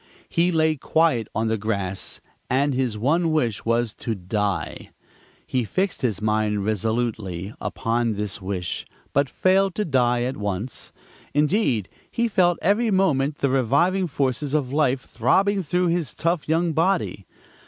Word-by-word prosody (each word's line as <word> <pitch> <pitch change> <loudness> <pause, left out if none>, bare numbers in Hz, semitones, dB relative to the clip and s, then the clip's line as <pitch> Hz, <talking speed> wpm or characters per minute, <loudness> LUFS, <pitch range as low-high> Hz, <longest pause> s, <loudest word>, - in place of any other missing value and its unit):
He 175 +2 +2
lay 160 -2 +2
quiet 140 -6 +2
on 110 +1 +1
the 110 -1 0
grass, 100 -3 -3 0.3
and 140 +3 +2
his 125 -4 -1
one 160 +9 +2
wish 120 -9 0
was 115 -1 +1
to 115 - -3
die. 100 +1 -2 0.6
He 130 -1 0
fixed 185 - -1
his 110 -6 -1
mind 105 -2 +1
resolutely 110 -3 -2
upon 115 0 0
this 105 0 -4
wish, 95 -2 -3 0.3
but 140 -1 +2
failed 190 +3 +2
to 210 - -1
die 125 -4 +2
at 130 +2 -2
once; 105 +3 -4 0.4
indeed 150 - +2 0.2
he 235 0 0
felt 175 -5 +3
every 210 +6 +3
moment 155 -8 +2
the 140 - +1
reviving 165 - +2
forces 140 0 -1
of 135 -3 -1
life 135 -3 +2
throbbing 200 +7 +1
through 180 +2 +1
his 170 -4 -1
tough 170 -2 -1
young 165 +1 +2
body. 165 - 0
130 Hz, 145 wpm, -23 LUFS, 110-165 Hz, 0.6 s, felt